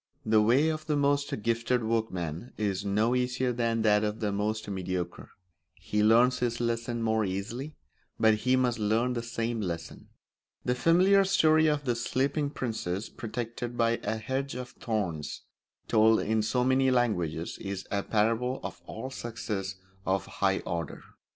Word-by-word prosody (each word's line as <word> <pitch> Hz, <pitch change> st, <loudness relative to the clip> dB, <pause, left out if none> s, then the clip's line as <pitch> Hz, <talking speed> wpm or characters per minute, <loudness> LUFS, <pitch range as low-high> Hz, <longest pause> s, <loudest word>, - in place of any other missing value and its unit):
The 110 Hz, 0 st, +4 dB
way 130 Hz, +9 st, +4 dB
of 155 Hz, 0 st, -4 dB
the 150 Hz, -, +1 dB
most 140 Hz, -5 st, +1 dB
gifted 115 Hz, +2 st, +1 dB
workman 110 Hz, -, -2 dB
is 100 Hz, -2 st, -1 dB
no 105 Hz, +4 st, +1 dB
easier 125 Hz, 0 st, 0 dB
than 115 Hz, -1 st, 0 dB
that 105 Hz, -1 st, +4 dB
of 105 Hz, +1 st, -2 dB
the 105 Hz, -3 st, -1 dB
most 105 Hz, +2 st, -2 dB
mediocre; 95 Hz, -2 st, -4 dB, 0.5 s
he 105 Hz, -, -2 dB
learns 120 Hz, +4 st, +5 dB
his 120 Hz, -1 st, -1 dB
lesson 115 Hz, 0 st, -1 dB
more 110 Hz, -1 st, +2 dB
easily, 110 Hz, +10 st, -4 dB, 0.4 s
but 110 Hz, 0 st, +5 dB
he 125 Hz, +4 st, +2 dB
must 125 Hz, -2 st, +1 dB
learn 110 Hz, +4 st, +1 dB
the 120 Hz, -, -2 dB
same 115 Hz, 0 st, -2 dB
lesson. 85 Hz, -4 st, -5 dB, 0.6 s
The 125 Hz, -, +2 dB
familiar 185 Hz, +9 st, +4 dB
story 160 Hz, -5 st, +4 dB
of 150 Hz, -2 st, 0 dB
the 120 Hz, -2 st, +1 dB
Sleeping 140 Hz, +5 st, 0 dB
Princess 110 Hz, -8 st, -3 dB
protected 120 Hz, +1 st, -5 dB
by 115 Hz, 0 st, +2 dB
a 110 Hz, +2 st, -2 dB
hedge 130 Hz, +5 st, -3 dB
of 125 Hz, 0 st, -5 dB
thorns, 90 Hz, -, -3 dB, 0.4 s
told 110 Hz, +1 st, +5 dB
in 110 Hz, +1 st, +1 dB
so 125 Hz, +3 st, +1 dB
many 130 Hz, +1 st, +3 dB
languages, 90 Hz, -10 st, 0 dB
is 100 Hz, -1 st, -4 dB
a 100 Hz, -, +1 dB
parable 115 Hz, +5 st, +1 dB
of -, -, -6 dB
all 130 Hz, -, -6 dB
success 105 Hz, -6 st, -4 dB, 0.3 s
of 95 Hz, 0 st, 0 dB
a -, -, -14 dB
high 95 Hz, -1 st, +1 dB
order. 85 Hz, -3 st, -4 dB
115 Hz, 160 wpm, -29 LUFS, 105-125 Hz, 0.6 s, learns